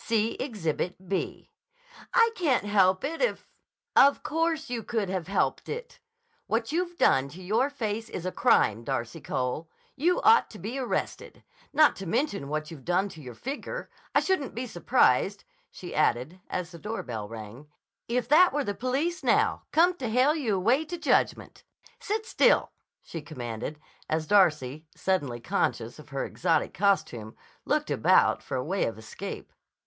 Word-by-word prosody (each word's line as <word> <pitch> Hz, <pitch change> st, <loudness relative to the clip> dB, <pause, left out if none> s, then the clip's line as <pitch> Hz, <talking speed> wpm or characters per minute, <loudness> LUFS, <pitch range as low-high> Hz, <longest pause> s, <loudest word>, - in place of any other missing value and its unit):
See 225 Hz, 0 st, +1 dB
Exhibit 185 Hz, -, -3 dB
B." 195 Hz, -, -3 dB, 0.6 s
"I 460 Hz, 0 st, +5 dB
can't 310 Hz, -, +1 dB
help 190 Hz, -1 st, +3 dB
it 320 Hz, +4 st, -3 dB
if—" -, -, 0 dB, 0.5 s
"Of 280 Hz, +1 st, +6 dB
course 325 Hz, 0 st, 0 dB
you 240 Hz, -2 st, -3 dB
could 220 Hz, -3 st, -2 dB
have 185 Hz, -3 st, -3 dB
helped 200 Hz, -, 0 dB
it! 480 Hz, +1 st, -6 dB, 0.5 s
What 225 Hz, +3 st, -1 dB
you've 350 Hz, +1 st, -2 dB
done 135 Hz, +1 st, +3 dB
to 180 Hz, +6 st, -11 dB
your 225 Hz, +9 st, +1 dB
face 225 Hz, -5 st, -3 dB
is 180 Hz, -, -6 dB
a 185 Hz, -, -1 dB
crime, 115 Hz, -, +3 dB
Darcy 135 Hz, +4 st, -3 dB
Cole! 130 Hz, +6 st, -3 dB, 0.3 s
You 345 Hz, +6 st, +2 dB
ought 450 Hz, +2 st, +6 dB
to 215 Hz, -, -11 dB
be 230 Hz, +7 st, -5 dB
arrested! 255 Hz, -, -3 dB, 0.3 s
Not 300 Hz, +1 st, +5 dB
to 195 Hz, -, -6 dB
mention 200 Hz, -, -1 dB
what 155 Hz, +1 st, -3 dB
you've 145 Hz, -5 st, -10 dB
done 185 Hz, +3 st, +1 dB
to 160 Hz, -, -11 dB
your 125 Hz, -4 st, -9 dB
figure. 285 Hz, -, -6 dB, 0.2 s
I -, -, +6 dB
shouldn't 370 Hz, -, -1 dB
be 245 Hz, +2 st, -3 dB
surprised," 185 Hz, -, +2 dB, 0.3 s
she 180 Hz, -, -9 dB
added 150 Hz, +5 st, 0 dB
as 180 Hz, -1 st, -3 dB
the 170 Hz, -, -10 dB
doorbell 120 Hz, -, -5 dB
rang, 115 Hz, +5 st, -9 dB, 0.4 s
"if 240 Hz, 0 st, -1 dB
that 350 Hz, +5 st, +7 dB
were 290 Hz, +1 st, 0 dB
the 205 Hz, -, -2 dB
police 275 Hz, -, -1 dB
now, -, -, +2 dB
come 345 Hz, +3 st, +5 dB
to 250 Hz, -7 st, -3 dB
hale 255 Hz, +6 st, +4 dB
you 245 Hz, -10 st, 0 dB
away 235 Hz, +11 st, +2 dB
to 350 Hz, +3 st, -6 dB
judgment. 330 Hz, -, 0 dB, 0.4 s
Sit 435 Hz, 0 st, -2 dB
still," -, -, +3 dB, 0.3 s
she 165 Hz, -, -7 dB
commanded 125 Hz, -1 st, -6 dB, 0.3 s
as 155 Hz, 0 st, 0 dB
Darcy, 155 Hz, -6 st, +2 dB
suddenly 145 Hz, -11 st, -1 dB
conscious 120 Hz, +1 st, -1 dB
of 150 Hz, -, -13 dB
her 140 Hz, -1 st, -2 dB
exotic 165 Hz, -3 st, 0 dB
costume, 125 Hz, -, 0 dB, 0.3 s
looked -, -, 0 dB
about -, -, +4 dB
for 130 Hz, -, -4 dB
a 125 Hz, -, -2 dB
way 190 Hz, +5 st, 0 dB
of 110 Hz, -, -4 dB
escape. 110 Hz, 0 st, -8 dB
200 Hz, 165 wpm, -28 LUFS, -, 0.6 s, that